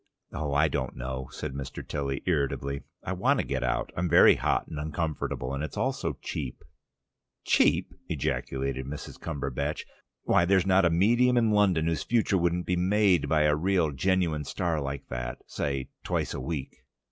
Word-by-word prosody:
"Oh, 75 -1 -3
I 75 +2 +4
don't 70 -4 -3
know," 65 +1 -5
said 75 -3 -5
Mr. 70 -1 -6
Tilly 70 -2 -3
irritably. 70 -4 -1 0.2
"I 95 - -2
want 90 - +2
to - - 0
get 65 -2 -2
out. 65 - -1
I'm 90 0 -1
very 85 - +8
hot - - 0
and 75 - -6
uncomfortable. 75 -4 -3
And 70 +2 -2
it's 80 - -6
all 130 +6 +1
so - - -3
cheap." 65 -5 -5 0.8
"Cheap?" - - +3 0.2
ejaculated 65 -1 -2
Mrs. 75 +1 -7
Cumberbatch. 70 -1 -3 0.4
"Why, 85 - +3
there's 95 0 +3
not 95 -1 +4
a - - +5
medium 120 +9 +3
in 115 -2 +3
London 95 -6 +3
whose 80 -1 0
future 110 -5 +2
wouldn't 85 +1 0
be 90 - 0
made 95 0 +3
by 75 -1 +3
a 75 -1 +4
real 85 -1 +1
genuine 85 0 +1
star 80 +2 -1
like 70 0 -5
that, - - -4
say, 70 -2 -3
twice - - -1
a - - -4
week." 70 0 -4
80 Hz, 175 wpm, -28 LUFS, 70-90 Hz, 0.8 s, very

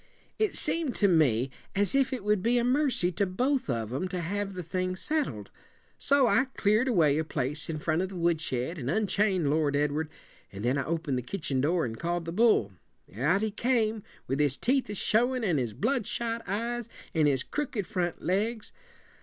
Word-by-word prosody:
"It 435 -1 +1
seemed 320 -7 0
to 205 - +3
me 135 - +3 0.2
as 200 +4 +2
if 275 -1 +2
it 255 -5 -3
would 210 -2 +2
be 235 +4 +2
a 240 - +2
mercy 250 -8 +1
to 195 +3 0
both 255 - 0
of 115 -2 -2
'em 165 +8 -1
to 180 0 -4
have 195 +3 -3
the 180 - -4
thing 185 +2 -2
settled. 305 +10 -1 0.5
So 280 -1 +4
I 255 +2 +3
cleared 215 +5 +3
away 160 - +3
a - - +1
place 150 0 -3
in 160 - -2
front 155 +2 0
of 190 - -2
the 195 - -9
woodshed 165 -3 -1
and 125 -1 -3
unchained 195 -5 +1
Lord 150 -2 +1
Edward, 150 +2 0 0.4
and 100 +3 -6
then 130 +3 +2
I 135 - -2
opened 155 -5 -1
the - - -3
kitchen 140 -2 -2
door 165 +4 +1
and 115 -1 -6
called 175 0 -2
the 165 - -4
bull. 205 - +3 0.4
Out 155 - +2
he 220 - 0
came, 225 -1 +1 0.2
with 135 +2 -2
his 145 -2 +2
teeth 260 -1 +1
a 210 - -4
showin', 245 +5 +1
and 175 -9 +2
his 115 -4 -3
bloodshot 235 - -1
eyes, 235 +4 -2 0.2
and 155 -2 +3
his 135 -3 +1
crooked 265 -9 -3
front 175 -2 -3
legs. 215 +4 -1
185 Hz, 195 wpm, -28 LUFS, 150-230 Hz, 0.5 s, So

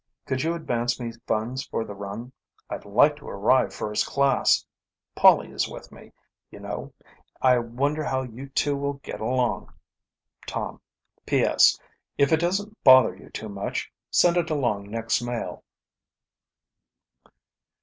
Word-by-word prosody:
Could 130 0 -1
you 165 +3 0
advance 120 -7 -1
me 120 -1 -4 0.2
funds 115 +4 -1
for 115 - -3
the 105 - -7
run? 100 +5 -7 0.4
I'd - - -5
like 135 +9 +4
to 145 - -11
arrive 120 +6 +2
first 105 0 -2
class. 140 -1 +2 0.5
Polly - - +5
is - - -1
with - - -10
me, - - -15 0.4
you - - -12
know. - - -6 0.5
I 125 -1 +4
wonder 140 +6 -1
how 130 -2 -1
you 130 +2 -9
two 145 +1 0
will 140 0 -2
get 140 -5 -9
along. 125 +2 -1 0.8
"Tom. - - -4 0.5
"P.S. - - +4 0.4
If 140 +1 +3
it 160 - +4
doesn't 200 +5 -2
bother 130 -8 +7
you 95 - -15
too 110 - -6
much, 100 -1 -4 0.2
send 175 0 +4
it 170 -1 +1
along 120 -10 -1
next 115 +1 -1
mail." 120 -1 -5
130 Hz, 140 wpm, -25 LUFS, 115-140 Hz, 0.8 s, bother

